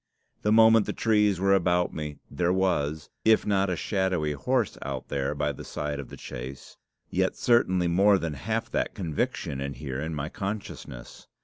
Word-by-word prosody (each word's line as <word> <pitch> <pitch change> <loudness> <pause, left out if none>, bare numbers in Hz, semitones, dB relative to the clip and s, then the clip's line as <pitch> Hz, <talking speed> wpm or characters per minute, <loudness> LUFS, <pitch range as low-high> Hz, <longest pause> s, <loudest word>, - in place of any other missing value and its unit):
The 105 - +1
moment 110 -1 +6
the - - -1
trees 105 -4 +2
were 100 +1 +3
about 90 -2 +2
me, 75 -2 -5
there 85 +5 +1
was, 80 -6 0
if 110 0 +4
not 100 -1 +2
a 90 - 0
shadowy 95 -6 0
horse 120 - 0
out 65 -2 -5
there 70 +1 -1
by 75 0 0
the 70 - -9
side 75 -1 -4
of 70 - -7
the - - -10
chaise, 65 +2 -8 0.4
yet - - +1
certainly 95 -7 +3
more 100 +4 +5
than 85 -4 -3
half 65 -4 -3
that - - -1
conviction 75 -5 -2
in 70 0 -3
here 70 -2 -5
in 80 +1 -3
my 75 0 -3
consciousness. 100 - -7
85 Hz, 180 wpm, -27 LUFS, 75-100 Hz, 0.4 s, moment